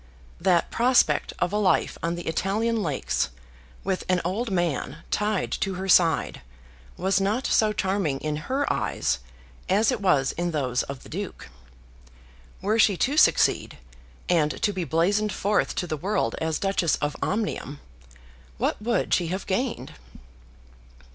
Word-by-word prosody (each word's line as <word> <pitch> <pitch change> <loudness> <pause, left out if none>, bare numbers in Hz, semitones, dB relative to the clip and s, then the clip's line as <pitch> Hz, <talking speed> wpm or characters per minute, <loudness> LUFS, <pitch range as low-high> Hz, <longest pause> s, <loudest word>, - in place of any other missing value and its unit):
That 175 -2 +2
prospect 245 +2 +3
of 180 +2 -1
a - - +2
life 190 -3 +2
on 170 +1 -1
the 175 - -7
Italian 215 +7 0
lakes 145 - -1 0.5
with 190 -1 -1
an 185 -1 +3
old 215 +7 -1
man 165 -5 -2
tied 210 -1 0
to 195 -1 -1
her 190 +1 -4
side 170 -3 +3 0.6
was 195 +1 +1
not 215 +7 0
so 215 -1 +3
charming 190 -8 -1
in 150 0 -2
her 275 +2 +1
eyes - - -1 0.5
as 210 +6 +3
it 240 -4 -3
was 145 -9 +3
in 175 +1 -2
those 130 -6 0
of 140 -2 -7
the - - -13
Duke. 195 - -6 1.1
Were 215 +3 +1
she 205 -4 +4
to 275 +10 +1
succeed, - - +3 0.5
and 155 -3 +1
to 205 - +2
be 185 -2 -3
blazoned 200 +8 +1
forth 205 +1 0
to 180 - -1
the 155 -3 -3
world 195 +8 -1
as 160 -1 0
Duchess 195 -4 +1
of 145 0 -2
Omnium, 195 -9 -2 0.8
what - - -1
would 230 -2 0
she 175 - +2
have 185 +4 -3
gained? 195 - -2
190 Hz, 150 wpm, -25 LUFS, 165-210 Hz, 1.1 s, she